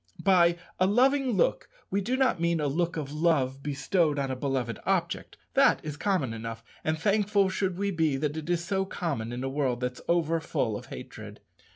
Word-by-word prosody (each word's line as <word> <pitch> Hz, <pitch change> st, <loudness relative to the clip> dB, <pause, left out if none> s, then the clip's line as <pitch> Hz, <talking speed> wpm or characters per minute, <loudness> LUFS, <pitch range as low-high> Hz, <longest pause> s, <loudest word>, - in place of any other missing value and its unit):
By 175 Hz, -3 st, +5 dB, 0.2 s
a 185 Hz, -, +4 dB
loving 260 Hz, +4 st, +3 dB
look -, -, +1 dB, 0.2 s
we 200 Hz, -, +1 dB
do 250 Hz, +7 st, -1 dB
not 260 Hz, -10 st, +2 dB
mean 170 Hz, -1 st, +2 dB
a 150 Hz, -, 0 dB
look 165 Hz, +4 st, 0 dB
of 145 Hz, -2 st, -4 dB
love 145 Hz, -5 st, +1 dB
bestowed 145 Hz, +2 st, +1 dB
on 135 Hz, -1 st, -1 dB
a -, -, -2 dB
beloved 125 Hz, -4 st, -2 dB
object. -, -, -1 dB, 0.2 s
That -, -, +5 dB
is 150 Hz, -2 st, -4 dB
common 160 Hz, -, 0 dB
enough; 115 Hz, 0 st, -6 dB, 0.2 s
and 155 Hz, 0 st, 0 dB
thankful 200 Hz, +2 st, +2 dB
should 185 Hz, -1 st, -1 dB
we 200 Hz, +1 st, 0 dB
be 160 Hz, -6 st, +1 dB
that 150 Hz, +1 st, -1 dB
it 160 Hz, +1 st, -5 dB
is 175 Hz, -1 st, 0 dB
so 195 Hz, +1 st, 0 dB
common 150 Hz, -, -3 dB
in 125 Hz, +1 st, -4 dB
a -, -, -1 dB
world 135 Hz, -3 st, 0 dB
that's 125 Hz, 0 st, -3 dB
overfull 165 Hz, -8 st, 0 dB
of -, -, -7 dB
hatred. -, -, -9 dB
160 Hz, 195 wpm, -28 LUFS, 135-190 Hz, 0.2 s, By